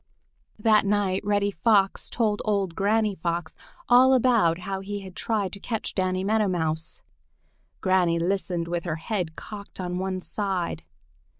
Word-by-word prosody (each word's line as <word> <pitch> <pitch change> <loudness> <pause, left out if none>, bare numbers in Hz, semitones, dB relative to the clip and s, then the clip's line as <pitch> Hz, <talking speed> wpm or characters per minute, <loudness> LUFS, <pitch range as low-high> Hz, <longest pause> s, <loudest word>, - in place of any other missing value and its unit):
That 215 0 +4
night 200 -2 +1
Reddy 205 0 +1
Fox 195 +1 +2
told 215 -3 0
old 200 -5 0
Granny 210 +3 +1
Fox 170 -2 -3 0.3
all 255 +2 +6
about 230 -10 +3
how 195 +1 -3
he 200 +1 -5
had 190 -2 -10
tried 205 -5 -1
to 200 - -7
catch 225 +1 -3
Danny 185 -1 0
Meadow 215 +1 +2
Mouse. 160 -3 -2 0.8
Granny 180 -3 +3
listened 175 -1 -1
with 170 0 -2
her 165 -3 -1
head 170 -1 -3
cocked 200 +1 -9
on 180 -1 -3
one 190 0 -2
side. 190 -2 -3
195 Hz, 145 wpm, -26 LUFS, 175-210 Hz, 0.8 s, all